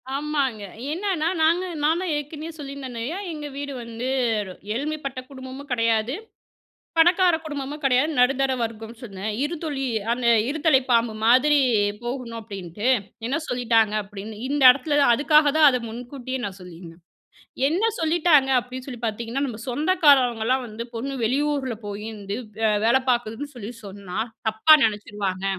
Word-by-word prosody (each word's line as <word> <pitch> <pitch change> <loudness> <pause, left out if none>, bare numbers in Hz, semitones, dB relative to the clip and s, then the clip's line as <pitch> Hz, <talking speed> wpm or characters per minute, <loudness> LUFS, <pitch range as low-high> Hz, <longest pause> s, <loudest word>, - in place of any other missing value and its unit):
ஆமாங்க. 280 -7 -1 0.3
என்னன்னா, 355 -3 -1
நாங்க 335 +4 +3 0.2
நான் 320 +3 +3
தான் 365 -4 -2
ஏற்கனவே 300 +2 -5
சொல்லியிருந்தேனயா, 275 +1 -5 0.2
எங்க 300 -1 -6
வீடு 285 -1 -5
வந்து 230 +2 -5 0.7
எளிமைப்பட்ட 280 -1 -3
குடும்பமும் 265 +1 -9
கெடையாது, 230 +1 +1 0.8
பணக்கார 350 +1 +5
குடும்பமும் 290 -1 -5
கெடையாது, 265 +4 +3
நடுத்தர 270 +1 +3
வர்க்கம் 225 0 -4
சொன்னே. 200 -5 -8 0.2
இருதலை 295 -4 -3 0.3
அந்த 245 0 -1 0.2
இருதலை 300 -2 +3
பாம்பு 230 -2 +3
மாதிரி 260 +6 +5 0.5
போகணும் 240 -2 -4
அப்டின்ட்டு, 200 +1 -5 0.4
என்ன 270 +6 0
சொல்லிட்டாங்க 230 -3 +2
அப்டின்னு. 205 +2 -9
இந்த 285 -1 0
இடத்துல 290 +2 0
அதுக்காக 295 +2 +4
தான் 310 -2 +8
அத 250 -1 -1
முன்கூட்டியே 250 +3 -6
நான் 200 -1 -6
சொல்லியிருந்தேன். 170 -1 -12 0.7
என்ன 350 +7 0 0.2
சொல்லிட்டாங்க 320 -4 +3
அப்டின்னு 255 +2 -9
சொல்லி 245 -3 -8
பார்த்தீங்கன்னா, 235 +5 -3
நம்ம 230 -3 -6
சொந்தக்காரவங்கலாம் 260 -5 +3
வந்து 225 +2 -6
பொண்ணு 270 +4 -4
வெளியூருல 275 0 0
போய் 205 +1 -6
வந்து 200 +1 -5 0.5
வேல 235 - +4
பார்க்குதுன்னு 240 +4 -1
சொல்லி 235 0 -7
சொன்னா 195 0 -6 0.3
தப்பா 220 +9 +6
நெனச்சுருவாங்க. 205 -3 -3
255 Hz, 130 wpm, -24 LUFS, 225-295 Hz, 0.8 s, தான்